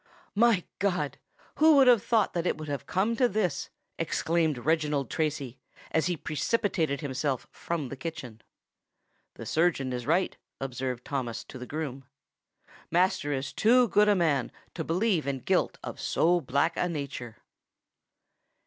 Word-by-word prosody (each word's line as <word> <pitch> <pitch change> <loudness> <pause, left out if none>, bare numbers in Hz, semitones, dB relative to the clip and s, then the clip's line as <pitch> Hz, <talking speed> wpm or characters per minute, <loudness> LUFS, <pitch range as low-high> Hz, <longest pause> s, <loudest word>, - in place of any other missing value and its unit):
"My 220 -4 +4 0.2
God! 190 -2 -1 0.4
who 315 0 +6
would 275 -1 +7
have 240 -4 +6
thought 225 -4 +2
that 175 0 -1
it - - 0
would 155 0 -7
have 140 -1 -4
come 205 - +1
to 250 -1 +4
this?" 185 -9 -1 0.3
exclaimed 160 -2 +1
Reginald 150 -1 0
Tracy, 140 -5 -2 0.3
as 160 +1 +2
he 175 -2 -1
precipitated 160 - 0
himself 140 -1 -2
from 160 -6 -4
the 135 - -5
kitchen. 130 -6 -7 0.9
"The - - -8
surgeon 155 -6 +1
is 125 -1 -4
right," 175 +4 +2 0.2
observed 130 -2 -4
Thomas 130 -5 -3
to 130 - -10
the 125 - -7
groom; 140 -4 -5 0.8
"master 180 -2 +2
is 135 -1 -3
too 245 +2 +4
good 210 0 +4
a 205 - +5
man 150 -8 +1 0.2
to 160 - -3
believe 175 -1 +1
in 140 -1 0
guilt - - +1
of - - -6
so 175 +1 +2
black 140 +5 +1
a 180 - +1
nature." 140 -7 -5
160 Hz, 150 wpm, -28 LUFS, 135-185 Hz, 0.9 s, would